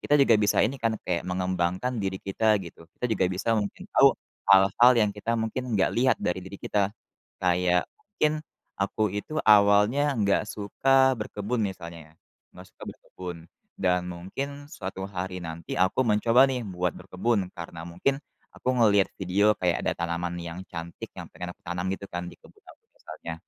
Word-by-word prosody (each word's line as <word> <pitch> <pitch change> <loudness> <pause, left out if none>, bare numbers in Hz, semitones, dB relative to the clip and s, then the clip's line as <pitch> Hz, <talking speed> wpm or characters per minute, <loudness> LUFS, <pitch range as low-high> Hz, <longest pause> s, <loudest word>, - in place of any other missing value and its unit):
kita 145 - +3
juga 135 -5 +5
bisa 105 -2 +3
ini 135 +5 -1
kan, 115 -1 +1
kayak 85 -1 -1
mengembangkan 90 +6 -1
diri 95 -1 -2
kita 110 +2 +2
gitu. 85 -1 -13
Kita - - -6
juga 95 -4 +2
bisa 95 +5 0
mungkin 105 -1 -3
tahu - - +6 0.3
hal-hal 100 +6 +7
yang 105 -2 +3
kita 115 +3 -2
mungkin 115 +2 -3
enggak 95 - +2
lihat 130 +2 +3
dari 90 +1 -1
diri 95 +1 -9
kita. 100 -2 +1 0.5
Kayak 90 0 +2
mungkin 180 -7 -1 0.5
aku 105 +2 0
itu 105 +9 -5
awalnya 105 +7 +5
enggak 100 0 +2
suka 130 +7 +3
berkebun 105 +2 -3
misalnya, 85 -4 -8 0.4
enggak - - -13
suka - - -19
berkebun. 90 -2 -9 0.4
Dan 90 -1 +2
mungkin 140 +12 -6
suatu 95 0 -6
hari 90 -1 -5
nanti 80 -1 -6
aku 95 +7 +2
mencoba 115 +3 +4
nih 125 -3 -2
buat 90 -2 -1
berkebun, 100 0 -1
karena 85 -1 -7
mungkin 135 +11 -1 0.3
aku - - -6
ngelihat 100 -5 +4
video 100 +3 +3
kayak 90 -2 0
ada - - +1
tanaman 85 +1 -3
yang 85 +1 -7
cantik 85 -1 -7
yang - - -8
pengen 90 0 -6
aku - - -50
tanam 90 +1 -3
gitu 100 - -5
kan 90 0 -4
di - - -12
kebun 420 - -21
aku 455 - -17
misalnya. - - -8
100 Hz, 170 wpm, -26 LUFS, 90-115 Hz, 0.5 s, hal-hal